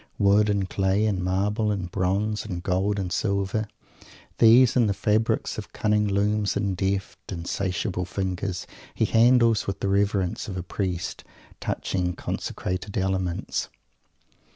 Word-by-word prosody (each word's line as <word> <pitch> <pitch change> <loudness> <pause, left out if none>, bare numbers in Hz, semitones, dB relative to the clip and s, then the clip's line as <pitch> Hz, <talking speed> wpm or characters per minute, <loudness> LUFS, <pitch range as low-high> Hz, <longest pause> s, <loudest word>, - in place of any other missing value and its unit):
Wood 100 +1 +4
and 100 -2 +1
clay 95 +2 +1
and 95 -4 0
marble 105 +4 0
and 95 -4 -2
bronze 100 +3 0
and 90 -5 -5
gold 95 +3 0
and 90 -3 -2
silver; 100 +2 0 0.7
these 120 +2 +7
and 120 -4 +4
the 100 - 0
fabrics 110 +3 0
of - - -9
cunning 105 0 +1
looms 100 +1 +1
and 100 -2 -1
deft, 95 0 -3
insatiable 90 +1 -2
fingers 95 -1 -3 0.3
he - - +2
handles 115 -1 +4
with 100 - -3
the - - -1
reverence 100 -2 0
of 95 -3 -5
a 90 - -3
priest 90 -1 -3 0.4
touching 90 -2 -2
consecrated 95 +3 -4
elements. 95 -2 -1
100 Hz, 135 wpm, -25 LUFS, 95-105 Hz, 0.7 s, these